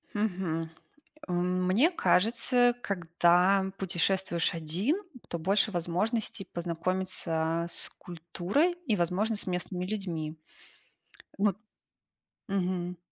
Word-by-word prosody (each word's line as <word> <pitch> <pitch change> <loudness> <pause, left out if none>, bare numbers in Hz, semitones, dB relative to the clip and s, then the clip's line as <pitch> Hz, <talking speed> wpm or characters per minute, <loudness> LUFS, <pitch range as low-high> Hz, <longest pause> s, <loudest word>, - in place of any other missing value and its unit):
Мгм. 180 -6 -1 0.6
А 180 - -4
мне 185 - +2
кажется, 245 - +3
когда 180 +1 +2
путешествуешь 185 -1 +1
1, 170 - 0 0.3
то 170 - -3
больше 195 +6 +2
возможностей 195 +5 -1
познакомиться 170 -1 -1
с - - +2
культурой 175 - -1
и, 220 -5 +2
возможно, 185 +6 0
с - - 0
местными 180 0 -2
людьми. 170 -6 -4 1.0
Вот. 200 -1 +2 0.9
Мгм. 180 -2 -2
180 Hz, 90 wpm, -29 LUFS, 170-200 Hz, 1.0 s, кажется